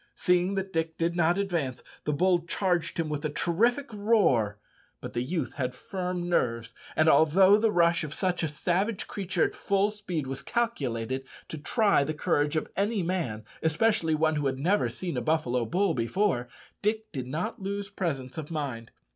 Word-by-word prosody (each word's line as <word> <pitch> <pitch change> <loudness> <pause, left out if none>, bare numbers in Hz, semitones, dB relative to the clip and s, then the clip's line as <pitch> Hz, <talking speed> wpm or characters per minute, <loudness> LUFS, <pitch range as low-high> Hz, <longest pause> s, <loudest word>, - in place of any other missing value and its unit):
Seeing 180 +2 +2
that 195 0 -3
Dick 165 0 -1
did 170 +1 0
not 170 +1 +3
advance, 170 -10 -2 0.2
the 150 - +1
bull 175 +2 +2
charged 180 -1 0
him 165 -2 0
with 150 -1 -3
a 155 - 0
terrific 230 - +1
roar; 200 - +2 0.4
but - - -8
the 120 - -1
youth 160 +7 -2
had 125 -2 -3
firm 180 +2 -4
nerves, 115 -8 0 0.2
and 155 - +3
although 165 +7 +6
the 220 0 +3
rush 170 -2 +3
of 150 - -5
such 180 +2 -1
a 160 - +1
savage 185 +8 -1
creature 190 -2 -1
at - - 0
full 200 +1 +1
speed 185 -8 -4
was 135 +1 -4
calculated 135 - -1 0.3
to 155 - -6
try 200 0 +3
the 155 +2 -3
courage 145 0 +1
of 155 - -2
any 200 +1 0
man, 160 - -2 0.2
especially 160 0 +2
one 155 0 +2
who 145 -2 0
had 130 -1 -1
never 180 +9 +2
seen 175 -7 -4
a - - 0
buffalo 125 -4 +1
bull 185 - +1
before, 125 - 0 0.3
Dick 215 +1 -1
did 130 -3 -4
not 175 - -3
lose 200 +1 -3
presence 160 -9 -3
of 150 - -7
mind. 135 -8 -4
165 Hz, 180 wpm, -28 LUFS, 140-195 Hz, 0.4 s, although